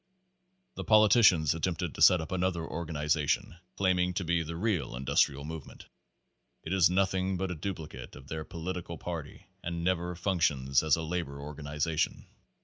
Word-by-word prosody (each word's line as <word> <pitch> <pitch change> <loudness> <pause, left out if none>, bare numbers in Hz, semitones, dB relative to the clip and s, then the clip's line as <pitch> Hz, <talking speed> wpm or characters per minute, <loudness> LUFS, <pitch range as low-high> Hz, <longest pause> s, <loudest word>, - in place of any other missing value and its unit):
The - - -6
politicians 105 - +5
attempted 80 0 -2
to - - -8
set 90 -3 +7
up 80 - -7
another 95 -2 0
organi 80 -2 -4
zation, 75 +2 0 0.2
claiming 90 -2 +1
to 95 - -1
be 85 0 +1
the 80 +1 -5
real 85 - -1
industrial 70 +2 +1
movement. 80 -2 -9 0.8
It 80 - -3
is 95 -2 +5
nothing 95 0 +1
but 95 0 -2
a - - -3
duplicate 80 -7 -6
of 65 - -13
their 80 +2 -4
political 85 0 -6
party 85 -4 -7 0.2
and 85 0 -3
never 90 -1 0
functions 80 -7 +1
as 80 -2 +3
a 80 - -4
labor 80 -4 -3
organization. 75 +2 -2
85 Hz, 155 wpm, -30 LUFS, 75-90 Hz, 0.8 s, set